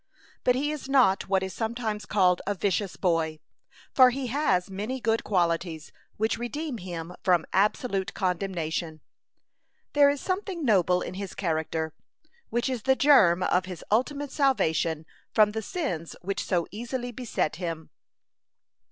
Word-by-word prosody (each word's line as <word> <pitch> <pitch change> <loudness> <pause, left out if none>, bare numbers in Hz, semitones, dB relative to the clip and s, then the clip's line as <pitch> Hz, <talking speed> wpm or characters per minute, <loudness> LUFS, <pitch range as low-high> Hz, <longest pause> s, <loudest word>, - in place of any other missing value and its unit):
But 250 - +3
he 290 +3 0
is 295 -3 -6
not 245 -9 +3
what 190 -1 +2
is 190 -1 -4
sometimes 220 -1 -3
called 180 -4 +3
a 205 - 0
vicious 195 0 -1
boy, 165 -3 0 0.6
for 255 -1 +7
he 255 0 -3
has 195 -12 +2
many 210 +7 -4
good 225 -2 0
qualities, 170 -4 -1 0.3
which 220 +2 0
redeem 270 +1 -4
him 175 -1 -6
from 180 -4 +3
absolute 200 0 +1
condemnation. 170 -4 -2 0.9
There 285 -1 +6
is 285 0 -1
something 370 -3 -3
noble 180 -5 +3
in - - -6
his 195 0 -6
character, 160 -3 -2 0.6
which 240 +2 0
is 255 -3 -2
the 265 +2 +3
germ 195 -12 +5
of 180 +1 +2
his 180 -3 -8
ultimate 280 +5 0
salvation 165 - +1 0.3
from 215 -1 +5
the 220 +1 -3
sins 205 - -4
which 195 +2 -2
so 175 -3 0
easily 245 +3 -4
beset 235 -10 -2
him. 165 -3 -5
200 Hz, 145 wpm, -27 LUFS, 175-250 Hz, 0.9 s, for